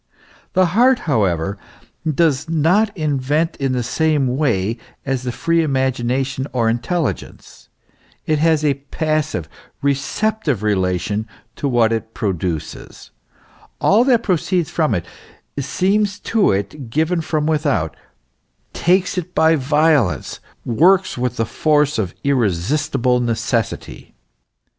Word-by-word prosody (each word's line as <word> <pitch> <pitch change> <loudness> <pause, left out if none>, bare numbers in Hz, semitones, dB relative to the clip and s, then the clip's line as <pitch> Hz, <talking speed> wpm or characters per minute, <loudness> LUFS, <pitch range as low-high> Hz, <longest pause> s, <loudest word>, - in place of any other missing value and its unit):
The 185 - +4
heart, 250 +4 +5
however, 100 - 0 0.5
does 155 -1 +1
not 170 +7 +3
invent 150 +1 0
in 135 -2 -1
the 125 -1 -1
same 145 -1 +1
way 115 -6 0 0.3
as 135 -2 -1
the 125 -1 -3
free 165 +6 +1
imagination 130 -1 -1
or 115 -3 +2
intelligence; 155 +7 -3 0.6
it 155 -1 +1
has 160 -1 +2
a 145 - +3 0.2
passive, 155 - -1 0.4
recep 175 +11 0
tive 135 - -1
relation 100 +1 0 0.3
to 145 - -2
what 120 -3 +3
it 115 0 -4
produces; 85 - -4 0.7
all 215 +4 +4
that 245 -4 +3
proceeds 180 -2 0
from 155 -9 +1
it 85 - -3 0.5
seems 190 +9 0
to 225 -3 +2
it 100 +7 -3
given 160 +6 0
from 155 -1 -1
without, 145 - 0 0.8
takes 180 +1 +1
it 180 +1 -9
by 160 +1 +4
violence, 145 - +1 0.3
works 180 - +3
with 125 0 -2
the 115 - +1
force 150 +2 +1
of 95 -5 -3
irresistible 125 - +1
necessity. 115 -1 -3
140 Hz, 120 wpm, -19 LUFS, 115-160 Hz, 0.8 s, heart